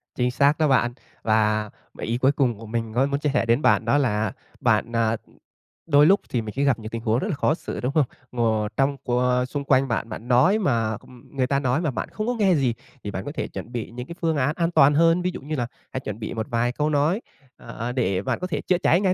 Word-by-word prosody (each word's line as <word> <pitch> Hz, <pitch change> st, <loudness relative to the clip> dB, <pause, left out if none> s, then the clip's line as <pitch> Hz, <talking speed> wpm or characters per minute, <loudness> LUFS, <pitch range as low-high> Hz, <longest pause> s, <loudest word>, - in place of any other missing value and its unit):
Chính 125 Hz, 0 st, +1 dB
xác 140 Hz, +3 st, +3 dB
đó 155 Hz, -, +3 dB
bạn. 120 Hz, -3 st, +2 dB, 0.3 s
Và 110 Hz, -1 st, +2 dB, 0.3 s
ý 115 Hz, +1 st, -1 dB
cuối 130 Hz, +2 st, +3 dB
cùng 130 Hz, -6 st, 0 dB
của 115 Hz, -, -10 dB
mình 115 Hz, 0 st, -3 dB
có 130 Hz, +3 st, +3 dB
muốn 140 Hz, 0 st, -1 dB
chia 150 Hz, -, 0 dB
sẻ 145 Hz, -, +2 dB
đến 115 Hz, +5 st, +2 dB
bạn -, -, +3 dB
đó 145 Hz, -, +3 dB
là 110 Hz, -6 st, +1 dB, 0.3 s
bạn, -, -, +2 dB
à, 115 Hz, -1 st, +2 dB, 0.7 s
đôi 145 Hz, -1 st, +6 dB
lúc 195 Hz, +5 st, +5 dB
thì 120 Hz, -, 0 dB
mình 110 Hz, -1 st, -7 dB
sẽ 140 Hz, -, +2 dB
gặp 135 Hz, -5 st, +2 dB
những 110 Hz, -1 st, -7 dB
tình 115 Hz, 0 st, -5 dB
huống 115 Hz, +1 st, +1 dB
rất 190 Hz, -, -2 dB
là 180 Hz, -, -1 dB
khó 145 Hz, -, +2 dB
xử, 165 Hz, -, -6 dB
đúng 125 Hz, -, -1 dB
không? 155 Hz, -, +4 dB, 0.3 s
Ngồi 110 Hz, -3 st, 0 dB
trong 135 Hz, +1 st, +2 dB
co 125 Hz, 0 st, +2 dB
xung 140 Hz, +2 st, -4 dB
quanh 135 Hz, -1 st, +3 dB
bạn, 115 Hz, -1 st, -2 dB
bạn 115 Hz, +1 st, -7 dB
nói 150 Hz, -, +4 dB
mà 115 Hz, -, 0 dB, 0.3 s
người 130 Hz, -2 st, 0 dB
ta 140 Hz, +1 st, +1 dB
nói 130 Hz, +2 st, 0 dB
mà 155 Hz, -5 st, 0 dB
bạn -, -, -4 dB
không 215 Hz, +1 st, -4 dB
có 245 Hz, -, +1 dB
nghe 195 Hz, -4 st, +4 dB
gì 130 Hz, -6 st, +1 dB, 0.3 s
thì 100 Hz, -, -4 dB
bạn 95 Hz, +1 st, -5 dB
có -, -, -4 dB
thể -, -, -2 dB
chuẩn 120 Hz, -, -8 dB
bị 120 Hz, -3 st, -5 dB
những 125 Hz, +2 st, -7 dB
cái 170 Hz, -, -8 dB
phương 160 Hz, -3 st, +1 dB
án 140 Hz, +3 st, +1 dB
an 170 Hz, -1 st, 0 dB
toàn 145 Hz, -3 st, +5 dB
hơn. 165 Hz, +3 st, +4 dB
Ví 180 Hz, +1 st, 0 dB
dụ -, -, -7 dB
như 150 Hz, +3 st, -4 dB
là 120 Hz, -4 st, -1 dB, 0.2 s
hãy 130 Hz, -, -3 dB
chuẩn 105 Hz, -4 st, -6 dB
bị 110 Hz, -, -5 dB
một 110 Hz, -1 st, -3 dB
vài 120 Hz, +1 st, +1 dB
câu 150 Hz, +4 st, -1 dB
nói, 155 Hz, +8 st, +1 dB, 0.4 s
ờ, 115 Hz, +1 st, -6 dB
để 95 Hz, -7 st, 0 dB
bạn -, -, -2 dB
có 180 Hz, -, -3 dB
thể 150 Hz, -5 st, -2 dB
chữa 180 Hz, -, +1 dB
cháy 175 Hz, +1 st, +3 dB
ngay 190 Hz, -2 st, +3 dB
130 Hz, 265 wpm, -24 LUFS, 115-150 Hz, 0.7 s, đôi